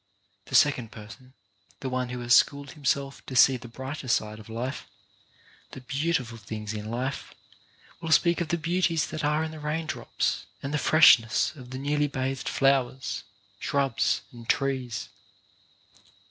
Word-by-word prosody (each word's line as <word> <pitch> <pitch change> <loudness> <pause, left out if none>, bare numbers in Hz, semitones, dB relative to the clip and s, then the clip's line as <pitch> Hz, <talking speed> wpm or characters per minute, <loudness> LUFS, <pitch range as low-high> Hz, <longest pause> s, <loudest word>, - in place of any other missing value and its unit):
The - - -4
second 125 -6 +4
person, 115 +4 -12 0.5
the 135 - -3
one 125 -1 -2
who 125 0 -5
has 120 0 +2
schooled 140 0 +3
him 150 -3 -14
self 140 +1 0
to 130 - -6
see 130 +1 +7
the 120 -1 -8
brighter 130 +4 -7
side 110 -3 0
of 110 - -13
life, 120 +4 -4 0.9
the 130 - -8
beautiful 135 -3 -2
things 105 0 -6
in 105 0 -5
life, 125 +4 -4 0.6
will 165 -1 -4
speak 170 +2 +4
of 170 - -1
the 170 - 0
beauties 170 -1 +1
that 155 - -5
are 150 +2 +2
in 160 - -4
the 155 - -9
rain 155 +2 -2
drops, - - -2 0.2
and 140 +2 -3
the 150 - +1
freshness 140 -4 +5
of 125 -4 -11
the 130 - -6
newly 145 +2 0
bathed 135 -1 -3
flowers, 130 -6 +1 0.3
shrubs 135 -8 +1
and 120 -2 -13
trees. 130 -6 -1
135 Hz, 160 wpm, -27 LUFS, 120-150 Hz, 0.9 s, see